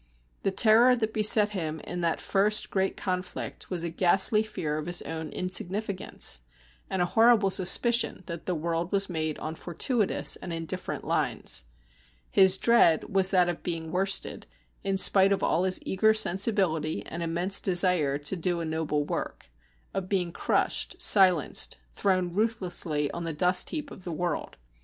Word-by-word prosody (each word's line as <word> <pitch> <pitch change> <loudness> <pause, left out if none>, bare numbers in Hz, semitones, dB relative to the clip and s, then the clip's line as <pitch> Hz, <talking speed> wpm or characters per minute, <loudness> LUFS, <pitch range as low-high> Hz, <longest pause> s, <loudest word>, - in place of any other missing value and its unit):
The - - 0
terror 225 +5 +5
that 220 -2 -3
beset 215 -1 +4
him 160 -6 -4
in 175 0 -6
that 165 -1 -1
first 210 +2 +1
great 190 0 -1
conflict 180 -1 -5
was 175 -3 -2
a 170 - -3
ghastly 190 +5 +5
fear 155 -8 -4
of 155 - -7
his 175 0 +1
own 160 -1 -6
insignificance, 185 - -1 0.5
and 185 -2 0
a 175 - -5
horrible 225 -3 +4
suspicion 210 +3 +2
that 170 -2 -8
the 180 - -1
world 165 +2 -3
was 195 -1 0
made 155 -2 -3
on 155 - -6
fortuitous 200 - -1
and 175 - -8
indifferent 165 -1 -5
lines. - - -1 0.7
His 190 -1 +5
dread 210 -10 +3
was 190 -1 +3
that 180 -2 +3
of 175 -2 -4
being 165 -2 -4
worsted, 190 +2 -1 0.4
in 195 -1 -1
spite 195 0 +4
of 200 - 0
all 175 +3 +1
his 185 -1 +1
eager 220 +3 +2
sensibility 190 -6 0
and 170 - -7
immense 175 +4 -1
desire 175 -6 +1
to 150 +6 -4
do 175 0 -2
a 165 - -4
noble 160 -2 -2
work, 65 - -6 0.4
of 185 -1 -4
being 180 -4 -1
crushed, - - -1
silenced, 185 -7 +3 0.2
thrown 185 -3 -1
ruthlessly 175 -8 -1
on 170 - -6
the 165 -1 -3
dust 180 +4 +2
heap 305 -2 -6
of 185 - -12
the 175 - -6
world. 175 +2 -4
180 Hz, 160 wpm, -27 LUFS, 165-195 Hz, 0.7 s, terror